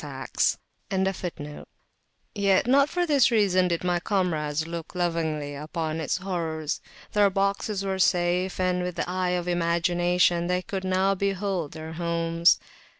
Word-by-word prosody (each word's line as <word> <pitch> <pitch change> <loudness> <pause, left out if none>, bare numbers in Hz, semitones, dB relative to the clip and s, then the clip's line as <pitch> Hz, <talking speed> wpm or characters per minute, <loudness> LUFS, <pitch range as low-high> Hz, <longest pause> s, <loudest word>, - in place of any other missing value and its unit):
[FN#12] - - -1 1.8
Yet 200 -2 +2
not 275 +3 +4
for 355 +1 0
this 280 -8 +4
reason 195 -5 +3
did 170 -1 -1
my 175 -1 +1
comrades 160 -6 -1
look 165 0 -7
lovingly 160 -4 -1
upon 155 +2 -4
its 155 - -1
horrors: 165 -5 -3 0.3
their 205 -1 +5
boxes 195 +1 -1
were 190 -1 -2
safe 180 0 +1
and 180 -1 +1
with 180 -1 -3
the - - -2
eye 180 0 -1
of 175 0 -4
imagination 175 0 +2
they 180 0 0
could 190 0 -4
now 190 +1 +2
behold 195 -4 -2
their 160 0 -7
homes. 170 0 +2
180 Hz, 140 wpm, -26 LUFS, 165-195 Hz, 1.8 s, their